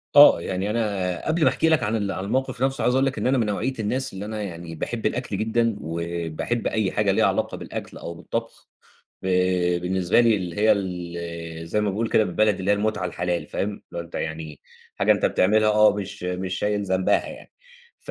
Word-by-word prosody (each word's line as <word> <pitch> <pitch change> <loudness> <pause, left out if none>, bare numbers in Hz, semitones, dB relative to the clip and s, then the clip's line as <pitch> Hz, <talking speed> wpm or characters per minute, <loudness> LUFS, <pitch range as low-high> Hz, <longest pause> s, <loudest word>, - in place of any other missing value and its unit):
آه، 145 -12 +9
يعني 95 +4 -2
أنا 100 -6 -1
قبل 160 +1 +1
ما 130 - +6
أحكي 160 - +1
لك 160 -7 +3
عن 105 +2 0
ال 100 -3 -1
عن 95 - -4
الموقِف 130 +3 -1
نَفْسه 135 0 0
عايز 125 - +3
أقول 135 +1 +3
لَك 135 - -1
إن - - 0
أنا 130 +1 +3
من 115 - +2
نوعية 105 +6 -1
الناس 125 +4 -1
اللي 95 +1 -6
أنا 110 0 -4
يعني 85 -4 -6
باحب 115 +8 -4
الأكل 120 -5 -1
جدًا، 115 +1 +1
وباحب 85 +6 -3
أي 105 -4 0
حاجة - - +2
ليها - - +3
علاقة - - 0
بالأكل - - -7
أو 85 - -6
بالطبخ، 85 - -5 0.6
ب - - -5 0.5
بالنسبة 90 +3 +2
لي 115 -2 +4
اللي 90 -4 -5
هي 110 +1 +5
ال 85 -3 -5
زي 105 - +1
ما 105 -1 +1
باقول 110 +4 -1
كده 110 - +3
بالبلدي 105 +1 +1
اللي 95 - 0
هي 105 - +6
المُتعة 105 -2 -1
الحلال، 90 -2 -2
فاهم، 100 - -2
اللي 105 - -10 0.2
هو - - -1
أنت 85 0 -11
يعني 80 -2 -5 0.4
حاجة - - +4
أنت - - +1
بتعملها، 110 +3 +3
آه 105 -1 +5
مش 100 -1 -6
مش 90 +1 -3
شايل 105 0 0
ذنبها 95 -1 +1
يعني، - - -11 0.5
ف - - -8
100 Hz, 210 wpm, -24 LUFS, 90-110 Hz, 0.6 s, آه